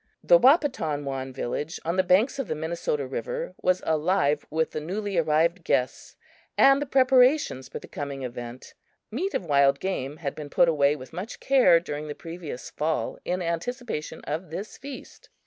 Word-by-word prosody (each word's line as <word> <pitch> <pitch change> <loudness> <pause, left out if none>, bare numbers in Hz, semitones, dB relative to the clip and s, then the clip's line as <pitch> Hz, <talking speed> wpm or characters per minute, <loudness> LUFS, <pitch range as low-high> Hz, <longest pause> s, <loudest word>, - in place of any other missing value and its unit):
The - - +6
Wahpetonwan 145 - +2
village 145 +5 -4
on 170 +2 0
the 185 - +4
banks 190 +9 +2
of 270 - -2
the 155 - -2
Minnesota 160 -2 -2
river - - -4
was 185 0 +1
alive 155 -2 +1
with 160 +1 0
the 155 - -4
newly 200 +5 -3
arrived 165 +3 +2
guests 130 -4 -1 0.4
and 275 +1 +6
the 290 - -2
preparations 255 - +3
for - - -6
the - - -10
coming 140 -2 -5
event. 120 0 -7 0.4
Meat 360 - -2
of 185 - -2
wild 140 -2 +3
game 150 -6 -3
had 150 -4 -4
been 150 -2 -8
put 170 - +4
away 145 -3 +3
with 130 0 -11
much 185 +7 -6
care 260 -11 +5
during 150 -2 -6
the 150 - -5
previous 165 -8 -8
fall 155 +1 -2
in 180 0 -1
anticipation 175 - -4
of 160 +4 -4
this 195 +7 -6
feast. 280 - -11
165 Hz, 170 wpm, -26 LUFS, 145-215 Hz, 0.4 s, The